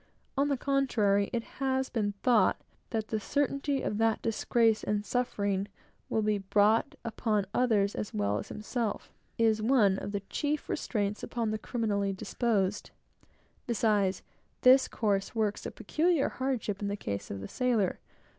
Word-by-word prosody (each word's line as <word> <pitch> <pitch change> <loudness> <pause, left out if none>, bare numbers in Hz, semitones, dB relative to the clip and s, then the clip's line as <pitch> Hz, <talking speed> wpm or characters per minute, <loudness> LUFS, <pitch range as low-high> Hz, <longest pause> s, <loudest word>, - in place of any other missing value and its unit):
On 280 +2 +2
the 280 -2 +1
contrary, 230 -8 +2
it 235 -1 -1
had 265 0 -2
been 205 -4 0
thought 230 -7 +4 0.3
that 220 -2 -2
the 220 - -1
certainty 275 +4 0
that 225 +1 +1
disgrace 225 0 +2
and 210 0 -1
suffering 205 -6 -1 0.4
will 220 - +1
be 210 -1 +1
brought 205 +3 +2
upon 220 -3 0
others 215 -5 +2
as 210 - -4
well 105 0 0
as - - -7
himself, 215 0 -3 0.2
is 220 -1 +3
one 215 -5 +3
of - - -5
the 200 -1 -2
chief 295 +9 -3
restraints 205 -2 -1
upon 230 -3 -2
the 215 - -2
criminally 205 -5 -1
disposed. 205 -1 -1 0.8
Besides, 210 -5 +1 0.4
this 260 +1 +7
course 200 0 -1
works 215 -2 -1
a - - -6
peculiar 310 - +1
hardship 250 -7 -2
in 205 - -1
the 200 - -1
case 100 - -4
of 100 - -5
the 95 - -6
sailor. 240 -7 0
215 Hz, 150 wpm, -30 LUFS, 200-245 Hz, 0.8 s, this